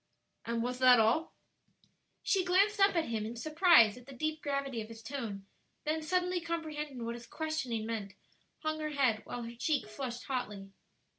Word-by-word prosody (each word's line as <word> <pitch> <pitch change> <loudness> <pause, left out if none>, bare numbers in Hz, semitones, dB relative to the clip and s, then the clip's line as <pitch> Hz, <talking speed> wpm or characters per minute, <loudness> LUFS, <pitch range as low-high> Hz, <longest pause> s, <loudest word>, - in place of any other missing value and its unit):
"And 230 0 -1
was 250 +1 -3
that 250 -2 +7
all?" 235 +10 +2 0.9
She 385 -2 +2
glanced 395 +4 +3
up 395 -1 +5
at 330 -5 +1
him 220 -2 -1
in 225 +2 -5
surprise 310 - +5
at 250 0 -14
the 275 - -9
deep 310 +4 -2
gravity 275 -4 -2
of 215 - -7
his 225 0 -11
tone; 225 -8 -5 0.4
then 315 +1 0
suddenly 360 +2 0
comprehending 305 -6 -4
what 235 - -2
his 235 0 -9
questioning 275 -9 -2
meant, 210 -4 -4 0.5
hung 310 0 -1
her 305 0 -2
head, 250 -6 +2
while 245 - -5
her 230 0 -7
cheek 285 +1 0
flushed 240 +2 -5
hotly. 210 -7 -4
265 Hz, 175 wpm, -32 LUFS, 230-315 Hz, 0.9 s, that